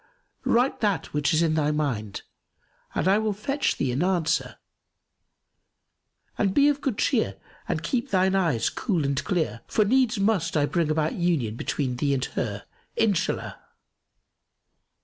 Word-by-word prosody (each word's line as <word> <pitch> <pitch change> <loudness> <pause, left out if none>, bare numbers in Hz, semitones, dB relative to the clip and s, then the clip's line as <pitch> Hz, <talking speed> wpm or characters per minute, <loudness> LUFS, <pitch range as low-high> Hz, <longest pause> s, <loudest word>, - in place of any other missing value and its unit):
Write 245 +3 +2
that 205 -6 -1
which 150 +1 +1
is 160 0 +3
in 160 -2 +2
thy 150 -2 +1
mind 130 -9 -2 0.7
and 165 - 0
I 195 +2 +4
will 215 -1 0
fetch 275 +8 -1
thee 135 - 0
an 130 - -1
answer, 175 -2 0 1.8
and 195 -2 +1
be 285 +1 +6
of 290 -1 -1
good 250 -7 -1
cheer - - +1 0.3
and - - -2
keep 255 +1 -1
thine 190 -2 +2
eyes 165 -12 +1
cool 180 - -1
and 140 0 -1
clear; 155 - -1
for 215 - +2
needs 245 -1 +2
must 195 -6 +1
I 145 - +3
bring 165 0 0
about 155 0 0
union 160 - 0
between 125 +1 -2
thee 140 +1 +1
and 130 - -1
her,— 100 -3 -4 0.3
Inshallah!" 210 -6 0
170 Hz, 150 wpm, -25 LUFS, 145-210 Hz, 1.8 s, be